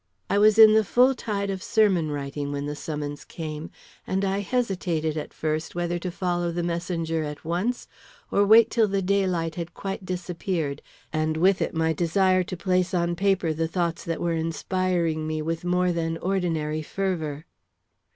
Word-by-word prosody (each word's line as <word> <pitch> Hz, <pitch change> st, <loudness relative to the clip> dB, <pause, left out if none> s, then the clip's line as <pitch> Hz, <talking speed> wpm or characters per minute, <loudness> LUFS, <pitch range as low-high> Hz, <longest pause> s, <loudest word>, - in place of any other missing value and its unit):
I 200 Hz, -, +3 dB
was 215 Hz, +1 st, +5 dB
in 220 Hz, -1 st, +9 dB
the 220 Hz, 0 st, +5 dB
full 250 Hz, +6 st, +4 dB
tide 200 Hz, -5 st, -3 dB
of 190 Hz, -1 st, -4 dB
sermon 190 Hz, -9 st, +2 dB
writing 145 Hz, 0 st, -4 dB
when 140 Hz, 0 st, -3 dB
the 145 Hz, 0 st, -4 dB
summons 145 Hz, -1 st, -5 dB
came, 155 Hz, -1 st, -6 dB, 0.4 s
and 190 Hz, +1 st, 0 dB
I 195 Hz, +1 st, 0 dB
hesitated 180 Hz, -8 st, -1 dB
at 155 Hz, -, -5 dB
first 155 Hz, +1 st, -3 dB
whether 175 Hz, 0 st, -1 dB
to 180 Hz, -, -4 dB
follow 175 Hz, -1 st, -1 dB
the 175 Hz, +1 st, -2 dB
messenger 170 Hz, -1 st, -2 dB
at 150 Hz, -1 st, -6 dB
once 185 Hz, +10 st, -1 dB, 0.4 s
or 200 Hz, -, +4 dB
wait 220 Hz, +3 st, +6 dB
till 225 Hz, -2 st, +3 dB
the 195 Hz, -1 st, -1 dB
daylight 180 Hz, -4 st, +1 dB
had 170 Hz, -1 st, -6 dB
quite 195 Hz, 0 st, -5 dB
disappeared, 175 Hz, -4 st, -3 dB, 0.3 s
and 155 Hz, 0 st, 0 dB
with 185 Hz, +3 st, +3 dB
it -, -, -1 dB
my 160 Hz, 0 st, +2 dB
desire 185 Hz, +3 st, +2 dB
to 185 Hz, -, -6 dB
place 185 Hz, +1 st, +1 dB
on 170 Hz, 0 st, +1 dB
paper 190 Hz, -3 st, +1 dB
the 165 Hz, +1 st, -1 dB
thoughts 170 Hz, -1 st, -2 dB
that 165 Hz, -1 st, -2 dB
were 170 Hz, -1 st, 0 dB
inspiring 165 Hz, 0 st, -1 dB
me 155 Hz, 0 st, -2 dB
with 165 Hz, +2 st, -3 dB
more 180 Hz, 0 st, +2 dB
than 165 Hz, -1 st, -1 dB
ordinary 165 Hz, -5 st, -1 dB
fervor. 160 Hz, -4 st, -3 dB
175 Hz, 175 wpm, -25 LUFS, 160-190 Hz, 0.4 s, in